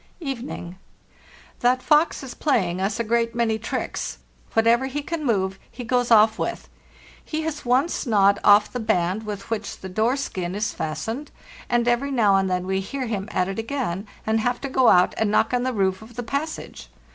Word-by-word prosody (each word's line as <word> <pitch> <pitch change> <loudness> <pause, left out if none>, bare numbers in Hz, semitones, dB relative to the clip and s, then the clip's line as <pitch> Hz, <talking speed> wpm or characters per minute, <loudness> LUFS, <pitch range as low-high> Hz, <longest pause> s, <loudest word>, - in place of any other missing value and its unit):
"Evening. 250 - -6 0.8
That 250 +1 +2
fox 300 0 +3
is 260 - -7
playing 190 - 0
us 200 +4 -1
a - - +1
great 230 +1 0
many 225 -2 +1
tricks; 220 - -4 0.4
whatever 230 +3 +4
he 285 +2 -4
can 335 0 -4
move 195 -6 0
he 245 - -8
goes 245 0 +1
off 220 -1 +5
with. - - -3 0.6
He 315 0 -3
has 310 -3 -4
once 260 +5 +1
gnawed 200 -2 +4
off 205 +1 +5
the 250 - -2
band 195 0 0
with 205 0 -6
which 220 -2 -3
the 190 - -8
door 220 +8 +1
skin 185 -9 -4
is 210 +1 -1
fastened, 225 - -4 0.4
and 240 0 +2
every 240 +4 +1
now 220 -7 +3
and 190 0 +1
then 180 0 -1
we 190 0 0
hear 260 +7 -4
him 210 -2 -3
at 180 -3 0
it 195 +2 -4
again, 225 -5 -3 0.2
and 220 +1 +2
have 245 +2 0
to 275 - -4
go 260 -1 +3
out 180 -3 +5
and 220 - +2
knock 230 +5 +2
on 245 - +2
the 255 +1 0
roof 190 -4 0
of 225 +1 -13
the 245 - -4
passage. 280 +7 -5
225 Hz, 195 wpm, -23 LUFS, 195-255 Hz, 0.8 s, off